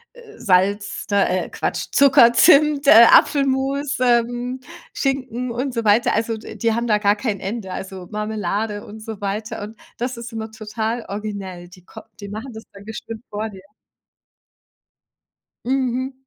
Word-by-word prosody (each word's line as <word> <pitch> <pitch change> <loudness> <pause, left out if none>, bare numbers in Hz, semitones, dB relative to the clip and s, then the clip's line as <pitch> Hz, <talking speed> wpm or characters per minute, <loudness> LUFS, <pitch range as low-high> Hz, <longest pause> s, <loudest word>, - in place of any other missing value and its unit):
äh, 465 -3 -15
Salz, 200 -1 +1
äh, 185 -2 +1
Quatsch, - - -3
Zucker, 270 -4 +6
Zimt, 300 0 +5
äh, 230 -1 +9
Apfelmus, 275 +1 +2
ähm, 245 +1 +1 0.3
Schinken 255 -3 -2
und 255 +2 -3
so 230 - -2
weiter. 210 +3 +3
Also, 225 0 -1
d 220 - -10
die 230 -1 0
haben 235 +1 -1
da 210 -1 +2
gar 205 0 +3
kein 210 -3 -3
Ende, 195 0 -5
also, 190 -2 -7
Marmelade 210 0 -3
und 215 +1 -11
so 220 -2 -8
weiter 210 +2 -4
und 215 +2 -9 0.2
das 250 +2 -3
ist 235 +1 -8
immer 220 -1 -6
total 220 +1 -4
originell. 195 -4 -6
Die 180 0 -17
kom - - -12 0.2
die 200 -1 -8
machen 225 +5 -7
das 220 0 -9
dann 200 0 -13
bestimmt 220 +1 -8
vor 215 +1 -3
dir. 190 -2 -13 2.0
Mhm. 260 0 -1
225 Hz, 155 wpm, -21 LUFS, 205-250 Hz, 2.0 s, äh